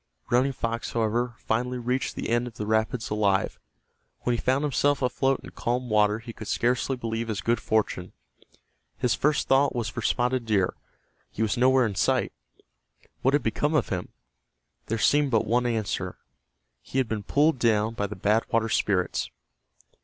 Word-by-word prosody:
Running 130 Hz, +3 st, +3 dB
Fox, 115 Hz, -1 st, -3 dB
however, 120 Hz, +2 st, 0 dB
finally 125 Hz, +3 st, -1 dB
reached 125 Hz, +2 st, -2 dB
the -, -, -4 dB
end 120 Hz, +1 st, +1 dB
of 115 Hz, -, -10 dB
the 105 Hz, -, -4 dB
rapids 110 Hz, +2 st, 0 dB
alive. 100 Hz, -2 st, +1 dB, 0.6 s
When 120 Hz, -, +1 dB
he -, -, -3 dB
found 135 Hz, +3 st, +1 dB
himself 145 Hz, -1 st, +1 dB
afloat 135 Hz, +1 st, +1 dB
in -, -, -10 dB
calm 125 Hz, +1 st, -2 dB
water 105 Hz, 0 st, +3 dB
he 115 Hz, +1 st, -9 dB
could 110 Hz, -, -9 dB
scarcely 125 Hz, +2 st, +1 dB
believe 115 Hz, -1 st, -3 dB
his 110 Hz, -4 st, -2 dB
good 115 Hz, 0 st, +1 dB
fortune. 105 Hz, -4 st, -1 dB, 0.9 s
His 125 Hz, -1 st, +1 dB
first 150 Hz, +1 st, +1 dB
thought 135 Hz, +1 st, +3 dB
was 115 Hz, -3 st, -1 dB
for 115 Hz, +2 st, -5 dB
Spotted 125 Hz, +1 st, 0 dB
Deer. 100 Hz, -4 st, +2 dB, 0.6 s
He 110 Hz, -, -2 dB
was 110 Hz, -, 0 dB
nowhere 130 Hz, +1 st, +4 dB
in 105 Hz, -, -2 dB
sight. 95 Hz, -, +1 dB, 0.9 s
What 135 Hz, +3 st, +3 dB
had 145 Hz, -, +1 dB
become 145 Hz, +7 st, 0 dB
of 150 Hz, -, +1 dB
him? 90 Hz, -2 st, -3 dB, 0.8 s
There 115 Hz, -, -1 dB
seemed 145 Hz, +5 st, +3 dB
but 115 Hz, -3 st, +2 dB
one 120 Hz, +3 st, +1 dB
answer. 110 Hz, -4 st, -2 dB, 0.6 s
He -, -, -6 dB
had 130 Hz, -3 st, +2 dB
been 110 Hz, -1 st, -2 dB
pulled 145 Hz, +6 st, +2 dB
down 110 Hz, -2 st, +2 dB
by 105 Hz, -3 st, -2 dB
the 105 Hz, -, -7 dB
Bad 105 Hz, +4 st, +1 dB
Water 115 Hz, 0 st, +2 dB
Spirits. 95 Hz, -4 st, 0 dB
115 Hz, 175 wpm, -26 LUFS, 110-125 Hz, 0.9 s, nowhere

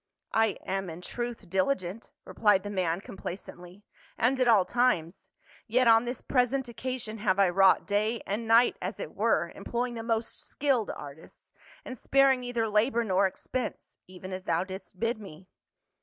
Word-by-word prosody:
" -, -, -59 dB
I 225 Hz, -2 st, +2 dB
am, 195 Hz, -1 st, -2 dB
in 165 Hz, +2 st, -8 dB
truth, 240 Hz, 0 st, -5 dB
diligent," 190 Hz, +2 st, -1 dB, 0.2 s
replied 205 Hz, -4 st, +2 dB
the 205 Hz, -, -5 dB
man 180 Hz, -2 st, -1 dB
com 195 Hz, -, -11 dB
placently, 180 Hz, +1 st, -8 dB, 0.2 s
" -, -, -29 dB
and 255 Hz, +3 st, +2 dB
at 255 Hz, -, +3 dB
all 210 Hz, -6 st, +5 dB
times; 200 Hz, -7 st, 0 dB, 0.4 s
yet 250 Hz, +2 st, +3 dB
on 225 Hz, +1 st, +6 dB
this 245 Hz, +1 st, -4 dB
present 260 Hz, +1 st, +1 dB
occa 255 Hz, +1 st, -4 dB
sion 220 Hz, -1 st, -7 dB
have 200 Hz, -3 st, +1 dB
I 195 Hz, -2 st, +4 dB
wrought 190 Hz, +2 st, +4 dB
day 210 Hz, +2 st, 0 dB
and 220 Hz, +3 st, -3 dB
night, 230 Hz, +2 st, +5 dB
as -, -, -4 dB
it -, -, -6 dB
were, -, -, +1 dB
em -, -, -11 dB
ploying 240 Hz, +1 st, -2 dB
the 230 Hz, -, -5 dB
most 225 Hz, 0 st, -1 dB
skilled 265 Hz, -7 st, 0 dB
artists, 145 Hz, +2 st, -10 dB, 0.3 s
and 260 Hz, -, -6 dB
sparing 270 Hz, +1 st, +3 dB
neither 245 Hz, -2 st, -2 dB
labor 225 Hz, +3 st, +2 dB
nor 195 Hz, -2 st, +2 dB
expense 245 Hz, +5 st, -6 dB
— -, -, -59 dB
even 185 Hz, +1 st, -9 dB
as 185 Hz, 0 st, -6 dB
thou 170 Hz, 0 st, +1 dB
didst 190 Hz, -1 st, -10 dB
bid 230 Hz, 0 st, -1 dB
me." 185 Hz, -3 st, -12 dB
215 Hz, 185 wpm, -28 LUFS, 190-240 Hz, 0.4 s, on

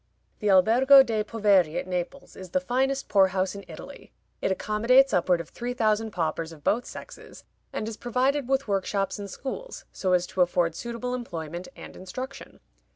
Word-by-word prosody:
The 210 Hz, -, 0 dB
Albergo 245 Hz, +8 st, +7 dB
dei 225 Hz, -4 st, -1 dB
Poveri 200 Hz, -7 st, +2 dB
at -, -, -5 dB
Naples 180 Hz, +9 st, -5 dB
is 185 Hz, -1 st, -10 dB
the 275 Hz, -, +1 dB
finest 270 Hz, +1 st, -1 dB
poor 195 Hz, -2 st, +5 dB
house 185 Hz, 0 st, -1 dB
in 200 Hz, 0 st, -8 dB
Italy. -, -, -11 dB, 0.3 s
It -, -, 0 dB
accommodates 230 Hz, +7 st, +3 dB
upward 180 Hz, 0 st, +2 dB
of 170 Hz, -, -7 dB
three 245 Hz, +1 st, -5 dB
thousand 220 Hz, -1 st, +1 dB
paupers 165 Hz, -3 st, -2 dB
of 155 Hz, -3 st, -14 dB
both 240 Hz, +3 st, +1 dB
sexes, -, -, -11 dB, 0.3 s
and 215 Hz, -, -4 dB
is 225 Hz, -1 st, -6 dB
provided 255 Hz, +3 st, 0 dB
with 270 Hz, -1 st, +1 dB
workshops 195 Hz, 0 st, -1 dB
and 200 Hz, -1 st, -6 dB
schools, 385 Hz, -, -7 dB
so 185 Hz, -2 st, -1 dB
as 180 Hz, 0 st, +3 dB
to 185 Hz, -, -2 dB
afford 175 Hz, -1 st, +2 dB
suitable 235 Hz, +5 st, -5 dB
employment 175 Hz, -8 st, -5 dB
and -, -, -11 dB
instruction. 255 Hz, +9 st, -8 dB
210 Hz, 175 wpm, -26 LUFS, 185-250 Hz, 0.3 s, Albergo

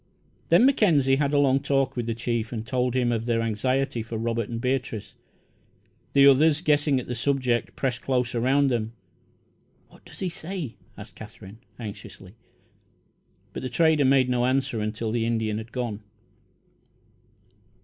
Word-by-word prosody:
Then 245 Hz, -, +6 dB
Mackenzie 160 Hz, -, +3 dB
had 140 Hz, -1 st, 0 dB
a 145 Hz, -, +2 dB
long 135 Hz, -1 st, +3 dB
talk 135 Hz, -1 st, 0 dB
with 120 Hz, -2 st, -3 dB
the 115 Hz, -, -1 dB
chief 115 Hz, -1 st, -2 dB
and 115 Hz, -2 st, -5 dB
told 125 Hz, +1 st, -1 dB
him 125 Hz, -2 st, +1 dB
of 115 Hz, 0 st, -2 dB
their 115 Hz, -1 st, +1 dB
anxiety 125 Hz, +3 st, -1 dB
for 115 Hz, 0 st, -6 dB
Robert 115 Hz, -1 st, -2 dB
and 115 Hz, -1 st, -4 dB
Beatrice. 125 Hz, -4 st, -3 dB, 1.0 s
The 140 Hz, 0 st, +6 dB
others, 145 Hz, +3 st, +5 dB
guessing 145 Hz, -4 st, +2 dB
at 125 Hz, -, -7 dB
the 125 Hz, -, -4 dB
subject, 125 Hz, -1 st, -1 dB
pressed 125 Hz, -3 st, -2 dB
close 125 Hz, -2 st, -1 dB
around 135 Hz, +3 st, +2 dB
them. 115 Hz, -2 st, -2 dB, 1.0 s
"What -, -, -20 dB
does -, -, -14 dB
he 185 Hz, -, -2 dB
say?" 170 Hz, -5 st, -6 dB, 0.2 s
asked -, -, -11 dB
Katherine, 100 Hz, +4 st, -12 dB, 0.2 s
anxiously; 100 Hz, -4 st, -9 dB, 1.2 s
but -, -, -5 dB
the 130 Hz, -, -4 dB
trader 155 Hz, +3 st, +3 dB
made 130 Hz, -1 st, +4 dB
no 125 Hz, 0 st, +1 dB
answer 130 Hz, -4 st, 0 dB
until 110 Hz, +1 st, -3 dB
the 115 Hz, 0 st, 0 dB
Indian 110 Hz, -2 st, -1 dB
had 110 Hz, +1 st, -10 dB
gone. 120 Hz, -5 st, -3 dB
125 Hz, 160 wpm, -25 LUFS, 115-140 Hz, 1.2 s, Then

